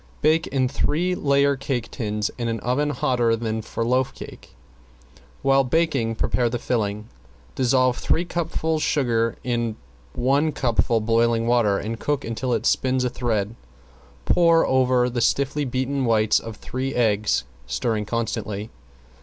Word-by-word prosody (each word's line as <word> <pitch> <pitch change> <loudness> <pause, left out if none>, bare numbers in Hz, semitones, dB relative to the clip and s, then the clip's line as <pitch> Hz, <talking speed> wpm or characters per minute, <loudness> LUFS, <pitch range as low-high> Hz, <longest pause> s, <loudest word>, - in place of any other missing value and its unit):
Bake 155 +1 +3
in 130 -2 +1
three 165 +6 0
layer 140 -3 +2
cake 130 -3 -3
tins 105 -3 -2
in 120 - -1
an 115 -1 -2
oven 140 +5 0
hotter 120 -5 +1
than 110 -1 -3
for 115 +1 -4
loaf 130 +2 +1
cake. - - -11 0.9
While 135 0 +4
baking 135 -5 0
prepare 120 +1 0
the 120 - -2
filling. 105 -3 -2 0.5
Dissolve 130 0 +2
three 175 - +1
cupfuls 160 -2 -2
sugar 115 -7 +1
in 120 -3 -1 0.4
one 140 +5 +1
cupful 115 -2 +1
boiling 115 +1 +2
water, 115 -4 +3
and 115 +3 -4
cook 145 -3 -1
until 115 +3 -3
it 115 -1 0
spins 130 0 +2
a 125 - -1
thread. 110 -4 -1 0.7
Pour 170 -1 +4
over 130 -1 +3
the 120 -1 -2
stiffly 140 +4 +1
beaten 130 +1 -1
whites 110 -2 +3
of 115 -1 -8
three 130 +4 -4
eggs, 110 - +1 0.2
stirring 105 - -1
constantly. 110 -2 -3
125 Hz, 145 wpm, -23 LUFS, 115-135 Hz, 0.9 s, While